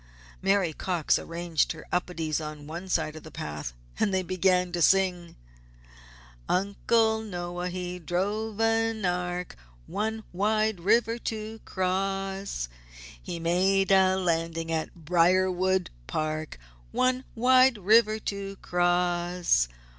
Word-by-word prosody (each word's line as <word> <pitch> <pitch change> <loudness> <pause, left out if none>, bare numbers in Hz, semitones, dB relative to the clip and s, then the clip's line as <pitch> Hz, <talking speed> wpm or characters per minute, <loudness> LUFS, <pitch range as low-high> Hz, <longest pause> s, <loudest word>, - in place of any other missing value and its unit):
Mary 195 -4 +2
Cox 175 -1 +1
arranged 170 -2 -1
her 160 - -11
Upedes 165 -3 -1
on 150 -1 -7
one 170 +5 -7
side 155 -3 0
of 155 - -8
the 155 - -11
path 75 - -5 0.3
and 200 - +2
they 190 -1 +1
began 180 0 +2
to 175 0 -2
sing: 180 -1 +2 1.1
"Uncle 220 +4 +2
Noah, 175 -3 -4
he 180 0 -5
drove 205 +6 -2
an 225 -1 +1
Ark 180 0 -2 0.3
One 220 - -3
wide 215 +1 +1
river 225 +5 +2
to 220 -1 -5
cross! 195 - -2 0.5
He 170 - -5
made 190 +3 +2
a 190 -1 +5
landing 165 -2 -1
at 160 -1 -2
Briarwood 180 +3 +2 0.2
Park 155 0 -3 0.3
One 255 0 +1
wide 255 +1 +5
river 215 +2 +4
to 200 -1 -4
cross! 175 - +1
185 Hz, 115 wpm, -27 LUFS, 170-200 Hz, 1.1 s, a